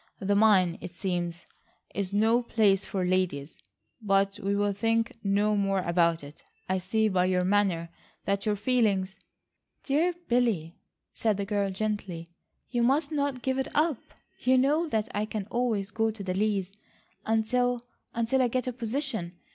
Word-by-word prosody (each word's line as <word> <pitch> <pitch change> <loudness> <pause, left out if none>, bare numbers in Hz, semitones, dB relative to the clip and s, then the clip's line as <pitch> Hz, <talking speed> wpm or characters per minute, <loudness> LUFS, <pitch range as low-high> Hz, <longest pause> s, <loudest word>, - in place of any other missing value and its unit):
The 200 +1 0
mine, 200 -5 +4
it - - -6
seems, 175 -1 -3 0.5
is 195 -1 -2
no 220 +4 +3
place 210 -5 +2
for 190 -2 -1
ladies. 180 -6 -1 0.4
But 195 -1 +2
we 200 +1 0
will 205 0 +1
think 225 +2 0
no 205 +1 +2
more 195 -1 +1
about 170 -2 +2
it. 145 +1 -12 0.3
I 185 0 0
see 220 +4 +1
by 185 -3 +2
your 185 0 +2
manner 190 -4 +1 0.4
that 200 0 0
your 210 -1 +1
feelings..." 205 -4 +1 0.6
"Dear 325 +6 +1
Billy," 225 -10 +1 0.4
said 215 -3 +1
the 200 - -2
girl 200 -1 0
gently, 190 -4 -3 0.4
"you 240 -2 +1
must 280 +5 +2
not 280 -4 -1
give 265 0 0
it 265 - -1
up. 305 -4 +2 0.4
You 255 +1 +3
know 295 +6 +3
that 220 -4 0
I 210 +1 0
can 215 -2 -4
always 230 -5 0
go 225 0 +1
to 215 -2 -6
the 185 -1 -2
Lees, 195 -1 0 0.5
until—until 245 +2 0
I 250 - +4
get 250 +1 -1
a 250 - -2
position. 230 - -3
205 Hz, 160 wpm, -28 LUFS, 190-235 Hz, 0.6 s, mine